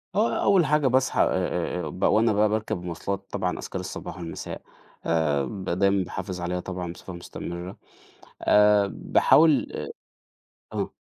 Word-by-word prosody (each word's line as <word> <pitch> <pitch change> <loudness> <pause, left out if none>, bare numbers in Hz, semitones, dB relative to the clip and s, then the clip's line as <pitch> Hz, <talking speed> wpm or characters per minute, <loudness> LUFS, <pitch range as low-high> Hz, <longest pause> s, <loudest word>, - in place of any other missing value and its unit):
آه 220 +3 +1
أول 190 -5 +4
حاجة 150 -1 +2
باصحى 130 0 +2
آآ - - +5
آآ 90 -1 -1
آآ 75 - -4
بق 90 - 0
وأنا 110 0 +3
بقى 105 +1 +3
باركب 110 -4 -1
المواصلات 90 +3 -4
طبعًا - - -2
أذْكارالصباح - - -6
والمساء، 85 -2 -6 0.4
آآ 75 -4 +1 0.3
دايمًا 100 0 +2
باحافظ 90 0 -5
عليها 90 +1 -2
طبعًا 90 -1 -5
بصفة 95 - -10
مستمرة 85 +1 -7 0.7
آآ 105 -1 +5
باحاول 155 -3 +4
آآ - - -5 0.9
آه. - - -3
95 Hz, 140 wpm, -25 LUFS, 85-110 Hz, 0.9 s, آآ